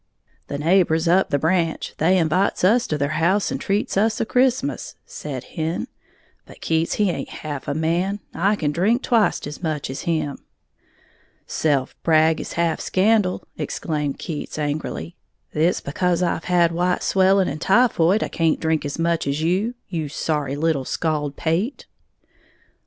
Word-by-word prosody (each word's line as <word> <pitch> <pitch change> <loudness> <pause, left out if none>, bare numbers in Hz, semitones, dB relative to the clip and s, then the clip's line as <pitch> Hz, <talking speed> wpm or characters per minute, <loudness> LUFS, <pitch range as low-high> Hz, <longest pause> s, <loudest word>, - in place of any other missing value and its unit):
"The 140 - -4
neighbors 165 +1 +2
up 185 +3 +3
the 145 - +2
branch 165 +2 0
they 180 +4 +4
invites 180 +4 +1
us 230 +6 +4
to 155 - -1
their 150 +2 -1
house 190 +5 +2
and - - -3
treats 200 +2 -1
us 220 +2 +2
a - - +1
Christmas," 255 +4 0
said 135 -4 -6
Hen; 160 +3 -3 0.6
"but - - -14
Keats 160 0 0
he 210 - +2
haint 180 - -2
half 145 -3 -6
a 140 - -1
man, 175 +6 0
I 195 +6 +2
can 150 -7 -1
drink 210 - +1
twict 230 -4 +2
as 145 0 -7
much 155 -5 -2
as 135 - -5
him!" 155 -4 -1 1.1
"Self 140 -4 0
brag 160 0 +3
is - - -7
half 170 -1 0
scandal," 200 -1 +2 0.2
exclaimed 150 -3 -2
Keats, 155 -3 -6
angrily; 150 +3 -3 0.4
"it's 165 +4 +1
because 180 +4 0
I've 170 -1 -1
had 175 -2 +3
white 180 +2 0
swelling 190 0 +3
and 150 +2 -4
typhoid 200 -3 +3
I - - -2
can't 165 -2 +1
drink 160 -1 0
as 145 -1 -4
much 165 -2 0
as 140 +3 -1
you, 195 +9 0
you 160 -5 -3
sorry 150 -2 -2
little 155 -2 0
scald 150 0 -2
pate!" 180 - -1
165 Hz, 160 wpm, -22 LUFS, 155-190 Hz, 1.1 s, they